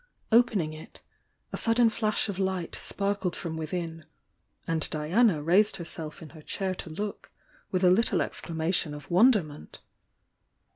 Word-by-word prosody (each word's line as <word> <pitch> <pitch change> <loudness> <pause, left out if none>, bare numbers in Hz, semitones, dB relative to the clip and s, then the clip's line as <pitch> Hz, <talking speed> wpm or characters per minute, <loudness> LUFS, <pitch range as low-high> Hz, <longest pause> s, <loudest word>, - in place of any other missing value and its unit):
Opening 215 -9 +3
it, 155 - -12 0.5
a - - -2
sudden 230 0 +4
flash 215 0 0
of 200 -2 -4
light 190 -3 -1
sparkled 200 -3 -1
from 165 -3 -5
within 165 0 -4 0.3
— - - -43
and 165 -2 0
Diana 160 +2 +2
raised 195 +6 +3
herself 165 -2 -6
in 155 - -10
her 155 0 -13
chair 190 +4 -3
to 175 - -7
look, 200 +6 -6 0.4
with 185 0 -1
a 180 - +6
little 220 +5 +3
exclamation 160 -2 -1
of 145 +2 -11
wonderment. 180 - +2
180 Hz, 145 wpm, -28 LUFS, 160-205 Hz, 0.5 s, a